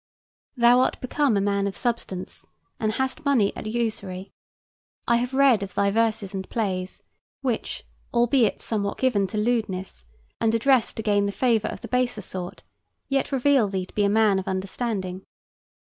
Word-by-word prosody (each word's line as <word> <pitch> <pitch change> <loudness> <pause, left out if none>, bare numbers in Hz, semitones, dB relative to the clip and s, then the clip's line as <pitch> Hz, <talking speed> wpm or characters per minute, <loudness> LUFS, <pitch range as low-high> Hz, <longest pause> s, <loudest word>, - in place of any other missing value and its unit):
Thou 240 +1 +6
art 255 - +1
become 260 -3 +1
a - - +2
man 200 0 +1
of 195 - -4
substance; 230 -6 -4 0.3
and 215 -1 0
hast 265 +5 -2
moneys 260 -9 +3
at - - -6
usury. 215 -5 -3 0.8
I 235 - +4
have 250 +2 -2
read 265 -6 +5
of 195 -2 -6
thy 200 0 +2
verses 220 -2 0
and 190 -1 -5
plays, 190 -5 -3 0.4
which, 250 -5 -2 0.3
albeit 240 -1 +2
somewhat 200 -3 -2
given 215 -7 +2
to 210 - -5
lewdness, 210 -4 -2 0.3
and 225 0 +2
addressed 255 +1 +3
to 220 - -3
gain 205 -2 +2
the - - -1
favor 230 -1 +1
of - - -6
the - - -7
baser 250 -3 0
sort, 180 -1 -6 0.5
yet 275 +1 0
reveal 270 -3 +3
thee 190 -2 -3
to - - -20
be 210 - +1
a 200 - +3
man 210 -2 +3
of 190 - -7
understanding. 190 -1 -3
220 Hz, 170 wpm, -25 LUFS, 200-245 Hz, 0.8 s, Thou